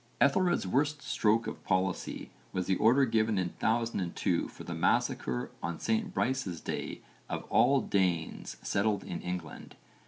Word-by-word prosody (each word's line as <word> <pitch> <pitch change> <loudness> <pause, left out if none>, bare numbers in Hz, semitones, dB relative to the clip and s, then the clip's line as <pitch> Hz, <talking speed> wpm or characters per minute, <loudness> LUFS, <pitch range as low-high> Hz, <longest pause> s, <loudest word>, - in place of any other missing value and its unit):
Ethelred's 175 - +3
worst 145 +8 0
stroke 110 +1 +2
of - - -6
policy 95 -1 -1 0.2
was 90 -1 -1
the 95 - +2
order 125 +6 +5
given 110 -2 +1
in 90 -2 0
1002 110 -6 0
for - - -11
the - - -5
massacre - - 0
on 85 -1 -3
St 220 -3 0
Brice's 130 - -1
Day - - -4 0.3
of - - -3
all 140 -1 +5
Danes 90 -5 -1
settled 100 0 +1
in 85 - -5
England. 90 -3 -6
110 Hz, 145 wpm, -31 LUFS, 90-135 Hz, 0.3 s, order